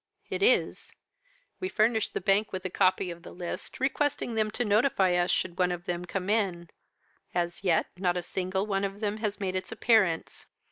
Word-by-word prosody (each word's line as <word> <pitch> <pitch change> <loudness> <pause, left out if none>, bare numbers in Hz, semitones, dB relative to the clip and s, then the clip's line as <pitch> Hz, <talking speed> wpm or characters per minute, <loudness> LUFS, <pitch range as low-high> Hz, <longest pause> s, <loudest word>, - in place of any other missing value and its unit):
"'It - - -2
is. 450 +5 +2 0.6
We 370 - -2
furnished 220 - +1
the - - -1
Bank 200 +3 +2
with 185 0 -5
a 185 - -2
copy 185 -1 +2
of 170 0 -9
the - - -11
list, 175 -1 -6
requesting 275 -1 0
them 215 -1 +1
to 240 +3 -2
notify 205 -3 +3
us 175 0 +2
should 175 0 -1
one 180 -1 +3
of 175 0 -5
them 175 0 -3
come 185 +1 -4
in: 190 -6 0 0.6
as 175 +1 -1
yet 175 -4 +3
not 180 -1 0
a 175 - -2
single 190 +2 -2
one 195 -2 -1
of 200 0 -3
them 210 -1 -1
has 215 -2 -2
made 190 -2 -2
its 185 0 -3
appearance. 220 -7 +1
190 Hz, 195 wpm, -28 LUFS, 180-215 Hz, 0.6 s, notify